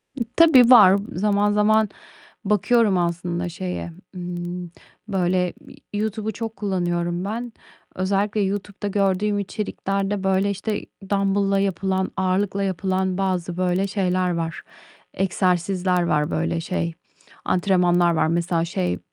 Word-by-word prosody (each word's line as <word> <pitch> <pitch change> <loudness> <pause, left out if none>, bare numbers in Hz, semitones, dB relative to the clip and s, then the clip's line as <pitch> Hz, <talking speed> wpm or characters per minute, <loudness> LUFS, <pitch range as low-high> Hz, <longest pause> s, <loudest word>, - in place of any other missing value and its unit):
E, 255 - -6
tabii 270 -8 +7
var. 205 -6 +8 0.2
Zaman 205 +2 +1
zaman 215 0 +3 0.6
bakıyorum 210 0 +3
aslında 175 0 -2
şeye, 180 0 -5 0.2
ımm, 175 0 -5 0.4
böyle, 180 -2 0
iii, - - -12 0.2
Y 205 - -1
YouTube'u 220 0 -2
çok 225 0 -5
kullanıyorum 175 -3 -1
ben. 230 +3 -4 0.4
Özellikle 200 +3 0
YouTube'da 200 +1 -3
gördüğüm 200 +1 +1
içeriklerde, 195 0 -3
böyle, 190 +1 +2
işte 205 +2 -3 0.2
dambılla 195 0 +1
yapılan, 190 0 -1
ağırlıkla 195 +1 0
yapılan 190 0 -1
bazı 180 -2 -1
böyle 185 +2 +1
şeyler 185 -2 0
var. 165 -1 -3 0.5
Egzersizler 185 -1 +1
var 150 -2 0
böyle, 165 +1 -1
şey, 170 -1 -2 0.5
antrenmanlar 175 -2 +3
var. 155 0 +2
Mesela, 170 0 0
şey, 90 - -2
190 Hz, 120 wpm, -23 LUFS, 175-200 Hz, 0.6 s, var